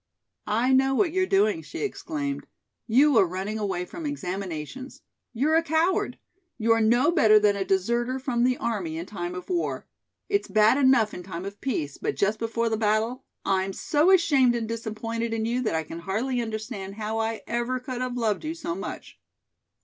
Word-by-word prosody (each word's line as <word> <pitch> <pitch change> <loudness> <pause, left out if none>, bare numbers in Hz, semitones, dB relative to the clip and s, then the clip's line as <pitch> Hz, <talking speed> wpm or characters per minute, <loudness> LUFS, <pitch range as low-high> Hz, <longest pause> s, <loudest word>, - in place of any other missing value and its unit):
"I 235 +5 +2
know 270 +1 +4
what 345 +3 +2
you're 375 +2 +1
doing," 395 -3 +2
she - - -8
exclaimed. 300 -8 -3 0.4
"You 265 +2 +5
are 190 - +4
running 190 +5 -4
away 190 -4 -2
from 325 - -6
examinations. 195 - -5 0.3
You're 280 +7 +1
a 325 - +5
coward. 330 +3 +1 0.4
You 230 0 +1
are 225 0 +4
no 240 +8 +4
better 220 -11 +6
than 210 -1 +4
a 200 - -1
deserter 235 +7 0
from 255 -3 -1
the 255 0 +2
army 185 -9 -2
in 165 - -4
time 180 -3 -5
of 180 - -7
war. 350 -2 -2 0.4
It's 405 0 0
bad 215 +6 +4
enough 260 -6 +4
in - - -6
time 180 0 -7
of 200 +1 -8
peace, 155 - -3
but - - -2
just 210 +2 +1
before 230 +1 -1
the 225 -1 0
battle 220 +4 0 0.2
I'm 190 0 +1
so 305 - +2
ashamed 285 -10 +4
and 230 -2 -2
disappointed 230 0 -3
in 220 -1 -1
you 240 +2 0
that 215 -9 -1
I 160 - 0
can 165 +2 -8
hardly 235 +8 -1
understand 215 -3 -5
how 220 +1 -3
I 225 0 -2
ever 240 +2 -1
could 255 -1 -5
have 250 -1 -2
loved 220 0 0
you 315 +1 -3
so 320 - -4
much." 195 +4 -7
230 Hz, 190 wpm, -26 LUFS, 205-265 Hz, 0.4 s, better